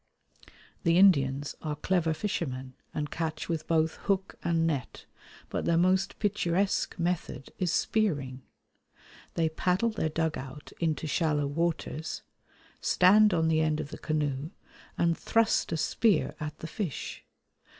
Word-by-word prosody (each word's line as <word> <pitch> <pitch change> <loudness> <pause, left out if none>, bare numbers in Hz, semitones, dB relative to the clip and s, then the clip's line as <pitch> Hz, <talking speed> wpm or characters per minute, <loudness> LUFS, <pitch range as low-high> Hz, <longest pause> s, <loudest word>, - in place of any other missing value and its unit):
The 170 -2 +3
Indians 145 -7 +4
are 150 -2 -3
clever 170 +1 +1
fishermen, 130 -10 -3 0.2
and 150 -1 -3
catch 160 -2 -3
with 160 -2 -3
both 160 -1 +2
hook 195 -1 +1
and 165 -1 +2
net, 145 -6 -3 0.5
but - - -2
their 170 - +3
most 185 +2 +2
picturesque 200 -2 0
method 170 -5 -2
is 180 -3 +1
spearing. 145 -12 0 0.9
They 165 -1 +2
paddle 180 +7 +1
their 190 -7 -1
dug 160 0 -1
out 135 +2 -9
into 160 -2 0
shallow 150 -1 +1
waters, 160 +1 -2 0.6
stand 210 +4 +5
on 165 -2 +2
the 160 0 +3
end 155 -1 +1
of - - -4
the - - -7
canoe, 150 -1 -1 0.5
and 170 -1 +2
thrust 225 +4 +1
a 165 - 0
spear 195 +3 +2
at 150 0 -5
the 160 - -7
fish. 180 - -5
160 Hz, 140 wpm, -29 LUFS, 150-180 Hz, 0.9 s, stand